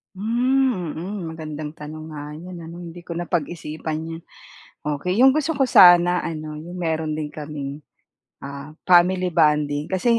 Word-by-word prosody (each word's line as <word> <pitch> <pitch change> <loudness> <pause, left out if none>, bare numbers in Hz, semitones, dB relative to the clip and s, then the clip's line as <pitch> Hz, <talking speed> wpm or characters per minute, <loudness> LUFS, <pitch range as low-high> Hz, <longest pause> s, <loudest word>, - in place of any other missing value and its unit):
Hmm, 235 - +1
mm. 195 +5 -5
Magandang 155 -2 -6
tanong 155 0 -9
nga 150 0 -7
'yon 175 +1 -9
ano, 165 +1 -9
hindi 170 +1 -9
ko 170 -1 -7
napag-isipan 160 -2 -3 0.2
'yan, 165 - -7 0.6
okey. 150 +5 -1
'Yong 260 +3 +7
gusto 310 +1 0
ko 270 - +3
sana 175 -6 +7
ano, 155 -1 -5
'yong 160 +4 -8
meron 160 -3 -1
din 150 -1 -4
kaming, 145 -1 -6 0.6
ah, 140 +2 -8
family 180 0 +4
bonding 150 -2 +2
kasi 230 +5 +2
165 Hz, 145 wpm, -23 LUFS, 150-180 Hz, 0.6 s, Yong